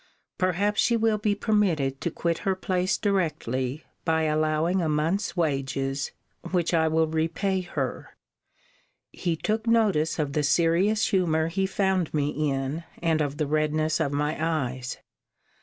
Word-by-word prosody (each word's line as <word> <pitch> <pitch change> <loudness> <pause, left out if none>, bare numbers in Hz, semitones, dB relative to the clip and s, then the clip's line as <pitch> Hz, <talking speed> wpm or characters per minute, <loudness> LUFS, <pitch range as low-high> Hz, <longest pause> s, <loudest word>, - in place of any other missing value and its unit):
Perhaps 195 +3 +1
she 235 -1 +3
will 220 -1 +2
be 210 0 +1
permitted 180 - +1
to - - 0
quit 170 +1 -1
her 195 -2 0
place 185 0 0
directly, 155 - -1 0.2
by 160 -1 +1
allowing 155 +3 +1
a 160 - 0
month's 165 +8 0
wages, 135 -3 -1 0.4
which 175 -2 0
I 160 -1 +3
will 160 0 +3
repay 165 +5 0
her. 145 -7 -5 0.9
He 170 -2 -2
took 220 +7 -2
notice 205 -9 +2
of 145 -3 -1
the 150 - +1
serious 170 +8 +2
humour 165 -5 +2
he 190 +3 0
found 190 -4 0
me 145 -1 +1
in, 145 +1 -2 0.2
and 165 -2 +1
of 145 -1 -2
the 155 - 0
redness 155 +1 +1
of 150 -3 0
my 150 +2 -1
eyes. 130 -6 -2
160 Hz, 145 wpm, -26 LUFS, 150-190 Hz, 0.9 s, she